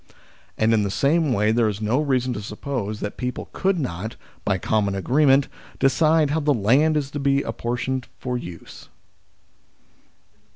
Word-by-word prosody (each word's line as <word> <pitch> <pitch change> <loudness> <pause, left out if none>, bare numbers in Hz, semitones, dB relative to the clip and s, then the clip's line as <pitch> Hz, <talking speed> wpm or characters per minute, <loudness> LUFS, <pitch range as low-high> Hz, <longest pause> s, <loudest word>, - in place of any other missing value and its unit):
And 110 +1 +3
in 110 - +3
the 100 - -1
same 145 - +2
way 105 -2 +2
there 115 -1 +2
is 105 -1 -4
no 110 +6 +1
reason 130 -4 0
to 105 - -5
suppose 105 0 -4
that 105 - -4
people 125 0 -4
could 195 -1 +1
not, 110 - -4 0.3
by 100 -2 +1
common 100 +1 0
agree 130 +10 +2
ment, 135 +1 +5 0.3
decide 155 +2 +3
how 160 - +1
the 145 -2 +2
land 135 +9 +3
is 140 -2 -2
to 145 - -4
be 140 0 +2
apportioned 125 +2 -3
for 125 0 -3
use. 90 -9 -9
125 Hz, 165 wpm, -23 LUFS, 105-140 Hz, 0.3 s, ment